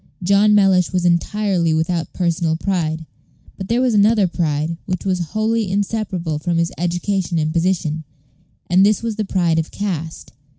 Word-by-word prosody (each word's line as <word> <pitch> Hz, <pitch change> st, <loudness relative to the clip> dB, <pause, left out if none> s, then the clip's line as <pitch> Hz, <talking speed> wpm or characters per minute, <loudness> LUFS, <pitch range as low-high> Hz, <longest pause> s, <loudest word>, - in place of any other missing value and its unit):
John 200 Hz, +3 st, +4 dB
Mellish 190 Hz, -3 st, +3 dB
was 180 Hz, -1 st, 0 dB
entirely 175 Hz, -1 st, +1 dB
without 160 Hz, 0 st, -1 dB
personal 170 Hz, -2 st, 0 dB
pride; 160 Hz, -3 st, -2 dB, 0.5 s
but 190 Hz, -, -7 dB
there 235 Hz, +3 st, +1 dB
was 255 Hz, -2 st, +2 dB
another 210 Hz, 0 st, +4 dB
pride, 160 Hz, -1 st, -2 dB
which 185 Hz, 0 st, -3 dB
was 185 Hz, -2 st, 0 dB
wholly 215 Hz, +4 st, -1 dB
inseparable 190 Hz, -5 st, -2 dB
from 170 Hz, +2 st, -1 dB
his 170 Hz, 0 st, 0 dB
education 175 Hz, +1 st, -1 dB
and 155 Hz, 0 st, 0 dB
position, 165 Hz, -3 st, 0 dB, 0.6 s
and 180 Hz, +2 st, +4 dB
this 210 Hz, +2 st, +2 dB
was 230 Hz, -2 st, -2 dB
the 215 Hz, -, -1 dB
pride 175 Hz, -4 st, +1 dB
of 160 Hz, -, -3 dB
caste. 165 Hz, -6 st, -5 dB
180 Hz, 160 wpm, -19 LUFS, 165-200 Hz, 0.6 s, John